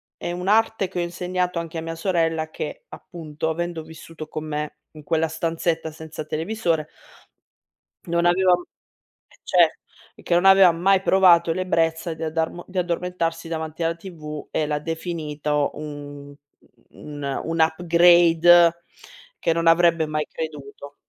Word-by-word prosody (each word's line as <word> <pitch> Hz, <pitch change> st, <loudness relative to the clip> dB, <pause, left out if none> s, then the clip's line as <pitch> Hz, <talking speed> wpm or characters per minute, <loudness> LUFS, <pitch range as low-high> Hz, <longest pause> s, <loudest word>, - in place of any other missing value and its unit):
È -, -, -5 dB
un'arte 200 Hz, +3 st, +1 dB
che 180 Hz, -1 st, -5 dB
ho -, -, +1 dB
insegnato 180 Hz, 0 st, -2 dB
anche 165 Hz, 0 st, -6 dB
a -, -, -3 dB
mia 165 Hz, 0 st, -5 dB
sorella 165 Hz, -3 st, 0 dB
che, -, -, -7 dB
appunto, 160 Hz, -2 st, -6 dB
avendo 170 Hz, 0 st, -3 dB
vissuto 160 Hz, 0 st, -11 dB
con 155 Hz, 0 st, -5 dB
me 150 Hz, 0 st, -4 dB, 0.2 s
in 155 Hz, -1 st, -12 dB
quella 160 Hz, +1 st, 0 dB
stanzetta 165 Hz, 0 st, -2 dB
senza 155 Hz, 0 st, -8 dB
televisore 165 Hz, -1 st, -2 dB, 1.2 s
non 170 Hz, 0 st, 0 dB
avevam 180 Hz, 0 st, +3 dB, 0.7 s
e -, -, -23 dB
cer -, -, +4 dB, 0.4 s
e -, -, -17 dB
che 170 Hz, -, 0 dB
non 175 Hz, -, +3 dB
avevam 190 Hz, -3 st, +7 dB
mai 190 Hz, +2 st, +3 dB
provato 175 Hz, -4 st, +5 dB
l'ebrezza 165 Hz, -2 st, -1 dB
di 160 Hz, -, -10 dB
addarmo 160 Hz, +2 st, -2 dB
di 185 Hz, 0 st, -5 dB
addormentarsi 170 Hz, -1 st, -2 dB
davanti 160 Hz, 0 st, -5 dB
alla 165 Hz, 0 st, 0 dB
TV 155 Hz, -5 st, -9 dB
e 155 Hz, -, -1 dB
l'ha 150 Hz, 0 st, -1 dB
definito 150 Hz, -2 st, -2 dB
un 145 Hz, -1 st, -9 dB, 0.6 s
un 145 Hz, -2 st, -6 dB
un 165 Hz, 0 st, -2 dB
upgrade 170 Hz, 0 st, +5 dB, 0.7 s
che 165 Hz, -, +1 dB
non 165 Hz, 0 st, -1 dB
avrebbe 165 Hz, -1 st, +4 dB
mai 155 Hz, 0 st, -2 dB
creduto. 145 Hz, -2 st, -8 dB
165 Hz, 140 wpm, -23 LUFS, 155-175 Hz, 1.2 s, avevam